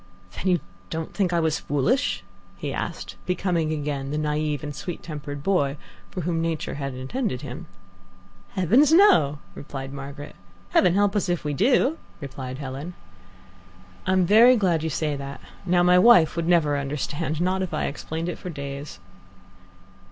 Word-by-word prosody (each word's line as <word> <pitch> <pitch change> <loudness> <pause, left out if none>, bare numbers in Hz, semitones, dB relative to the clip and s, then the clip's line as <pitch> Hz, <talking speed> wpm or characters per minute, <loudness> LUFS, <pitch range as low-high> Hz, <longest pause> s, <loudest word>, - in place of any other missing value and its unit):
"Then 190 - -4
you 180 -2 +3 0.3
don't 160 0 -4
think 190 -4 +1
I 170 - +2
was 160 -1 +1
foolish?" 195 - 0 0.3
he - - -4
asked, - - -5
becoming 175 -3 0
again 145 -3 -3
the 150 - -2
naive 150 0 -1
and 145 -1 -5
sweet 175 +3 -6
tempered 145 -3 -6
boy 145 -7 +1 0.3
for 180 - -5
whom 165 0 -1
Nature 165 -1 -2
had 140 -2 -4
intended 130 - -3
him. 130 -4 -7 0.9
"Heavens, 235 - +4
no!" 245 - +6 0.2
replied 135 -1 -7
Margaret. 140 +1 -8 0.3
"Heaven 180 -1 +4
help 205 0 +2
us 195 -3 0
if 175 -1 0
we 150 - -1
do!" 260 - +2 0.2
replied 130 -3 -6
Helen. 140 +5 -6 1.1
"I'm 185 -1 +3
very 230 +7 +7
glad 175 -6 +2
you 160 - -1
say 150 -1 -1
that. 140 -1 -7 0.3
Now, 175 0 +4
my 180 0 +6
wife 180 -8 +6
would 170 -1 -1
never 155 -5 +3
understand 150 +3 -3
not 185 +2 +1
if 185 - -3
I - - -1
explained 160 +4 -4
for 180 - -6
days." 140 -2 -6
160 Hz, 160 wpm, -24 LUFS, 145-180 Hz, 1.1 s, very